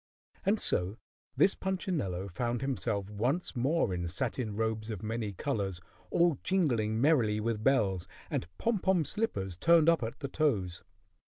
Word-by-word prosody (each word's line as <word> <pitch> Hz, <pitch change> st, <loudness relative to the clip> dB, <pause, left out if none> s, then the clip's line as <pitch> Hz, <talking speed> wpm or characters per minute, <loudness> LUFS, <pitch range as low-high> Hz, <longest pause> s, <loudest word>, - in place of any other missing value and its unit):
And 210 Hz, +2 st, +3 dB
so 90 Hz, +5 st, +2 dB, 0.4 s
this 195 Hz, -, +5 dB
Punchinello 155 Hz, -, -2 dB
found 120 Hz, +6 st, -2 dB
himself 115 Hz, -7 st, -1 dB
once 125 Hz, -, -1 dB
more 130 Hz, -, +1 dB
in 85 Hz, -1 st, -2 dB
satin 110 Hz, +3 st, -2 dB
robes 110 Hz, 0 st, -1 dB
of 105 Hz, -2 st, -5 dB
many 110 Hz, -1 st, -2 dB
colors, 100 Hz, -4 st, -2 dB, 0.3 s
all 170 Hz, -5 st, +3 dB
jingling 120 Hz, -, +1 dB
merrily 120 Hz, -7 st, +3 dB
with 110 Hz, -1 st, -2 dB
bells, 100 Hz, -10 st, +2 dB, 0.2 s
and -, -, -2 dB
pom 230 Hz, -3 st, 0 dB
pom 180 Hz, -4 st, +2 dB
slippers 100 Hz, -, -2 dB
turned 165 Hz, -, +5 dB
up 165 Hz, -4 st, +3 dB
at 115 Hz, 0 st, -4 dB
the 140 Hz, -, -2 dB
toes. 105 Hz, -, 0 dB
115 Hz, 150 wpm, -31 LUFS, 100-155 Hz, 0.4 s, this